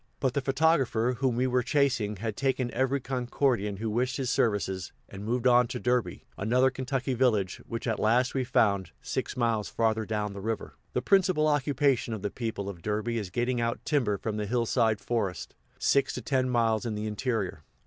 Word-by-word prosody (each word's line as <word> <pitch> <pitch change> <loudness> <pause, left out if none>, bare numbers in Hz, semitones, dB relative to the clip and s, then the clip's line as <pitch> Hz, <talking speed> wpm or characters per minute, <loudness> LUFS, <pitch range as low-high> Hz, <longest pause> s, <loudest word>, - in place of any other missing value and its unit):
But 130 -2 0
the 140 - 0
photographer, 135 -4 +2
whom 130 -3 +1
we 125 +2 +1
were 125 0 +2
chasing, 125 -5 +1
had 110 +2 -4
"taken" 130 -2 -1
every 130 +2 +1
Concordian 125 -5 -1
who 110 +3 -3
wished 125 +4 0
his 130 -3 -1
services, 95 -5 0 0.2
and 100 0 -9
moved 120 +3 -1
on 125 -1 +5
to 120 - -4
Derby, 125 -1 -1
another 125 +6 +3
Kentucky 130 0 -2
village, 115 -7 +1
which 115 -1 -4
at 115 -3 -1
last 120 +3 +2
we 130 - 0
found, 100 -7 +2
six - - -3
miles 115 -3 0
father 110 -1 +1
down 105 -2 -2
the 100 - -7
river. 110 +2 -3 0.2
The - - -1
principal 185 -6 +3
occupation 140 -5 +1
of 105 - -8
the 105 - -2
people 110 -4 -4
of 95 -4 -7
Derby 110 +4 -1
is 100 -4 -5
getting 120 +4 0
out 115 0 -2
timber 120 -9 +1
from 105 +1 -3
the 105 -1 -2
hillside 115 -1 +1
forests, 105 -8 -2 0.2
six 140 - +2
to 125 - -4
ten 130 +1 +1
miles 115 -3 +2
in 115 -3 -3
the 105 +1 -3
interior. 105 - -2
120 Hz, 190 wpm, -28 LUFS, 105-130 Hz, 0.2 s, on